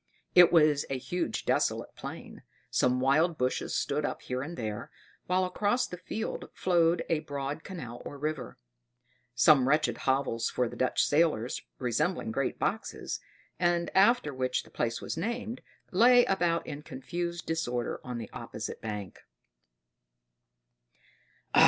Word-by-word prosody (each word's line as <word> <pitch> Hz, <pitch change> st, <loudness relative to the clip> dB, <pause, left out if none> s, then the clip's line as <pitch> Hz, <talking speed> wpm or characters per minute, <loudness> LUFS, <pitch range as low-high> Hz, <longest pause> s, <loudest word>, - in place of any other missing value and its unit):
It 180 Hz, -1 st, +8 dB
was 150 Hz, -4 st, +5 dB
a 135 Hz, -, -1 dB
huge 175 Hz, +7 st, -3 dB
desolate -, -, 0 dB
plain; -, -, -8 dB, 0.3 s
some 125 Hz, 0 st, +2 dB
wild 155 Hz, +6 st, +3 dB
bushes 125 Hz, 0 st, -1 dB
stood 150 Hz, +1 st, 0 dB
up -, -, -3 dB
here 125 Hz, 0 st, -3 dB
and 160 Hz, +5 st, -6 dB
there, 105 Hz, -3 st, -4 dB, 0.4 s
while 185 Hz, +1 st, +2 dB
across 205 Hz, +6 st, +1 dB
the 180 Hz, -, -8 dB
field 220 Hz, +4 st, -4 dB
flowed 170 Hz, -2 st, +2 dB
a 165 Hz, -, +1 dB
broad 145 Hz, 0 st, -4 dB
canal 120 Hz, -11 st, -7 dB
or 145 Hz, -, -7 dB
river. 150 Hz, -4 st, -4 dB, 0.8 s
Some 130 Hz, +1 st, +6 dB
wretched 150 Hz, +2 st, +2 dB
hovels 130 Hz, -4 st, +1 dB
for 125 Hz, -, 0 dB
the -, -, -8 dB
Dutch 130 Hz, -, +2 dB
sailors, 145 Hz, -6 st, +2 dB, 0.2 s
resembling 130 Hz, +2 st, 0 dB
great 135 Hz, +3 st, -1 dB
boxes, -, -, -2 dB, 0.4 s
and 175 Hz, -1 st, +1 dB
after 195 Hz, -, +4 dB
which 130 Hz, -1 st, -1 dB
the -, -, -18 dB
place 115 Hz, -1 st, -2 dB
was -, -, -4 dB
named, 235 Hz, +6 st, -3 dB, 0.3 s
lay 245 Hz, +5 st, +6 dB
about 175 Hz, -3 st, +1 dB
in 145 Hz, -, -6 dB
confused 170 Hz, +5 st, -4 dB
disorder 125 Hz, -7 st, -2 dB
on 125 Hz, -1 st, -5 dB
the 115 Hz, -3 st, -7 dB
opposite -, -, -6 dB
bank. 105 Hz, -4 st, -5 dB
150 Hz, 140 wpm, -30 LUFS, 125-175 Hz, 0.8 s, It